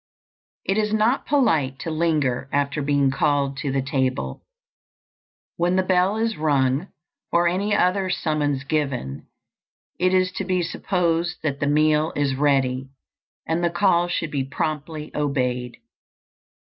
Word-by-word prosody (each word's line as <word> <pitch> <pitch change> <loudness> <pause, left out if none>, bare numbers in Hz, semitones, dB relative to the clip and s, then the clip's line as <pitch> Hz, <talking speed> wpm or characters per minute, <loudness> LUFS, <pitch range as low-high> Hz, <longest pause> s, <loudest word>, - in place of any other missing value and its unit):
IT 195 +2 +1
is 210 -1 0
not 220 +5 +1
polite 160 - +2
to 165 - -5
linger 150 -6 0
after 145 +1 0
being 140 -1 +2
called 140 0 +1
to 140 0 -3
the 135 0 0
table. 130 -1 -1 1.2
When 175 +2 +1
the 190 - +3
bell 185 +2 +2
is 225 0 -1
rung, 145 +1 +1 0.4
or 170 0 +3
any 200 +4 +1
other 185 +1 +2
summons 150 -6 -1
given, 140 - -2 0.7
it 185 +1 +3
is 185 0 +2
to - - -1
be 185 -2 0
supposed 175 -1 -1
that 140 -3 -1
the 145 - 0
meal 155 +1 +2
is 140 -2 +1
ready, 135 -2 +1 0.6
and 165 +2 -1
the 170 - +3
call 175 -1 +2
should 170 -3 -2
be 140 -2 -1
promptly 150 +2 -4
obeyed. 125 -4 -1
155 Hz, 140 wpm, -23 LUFS, 140-180 Hz, 1.2 s, the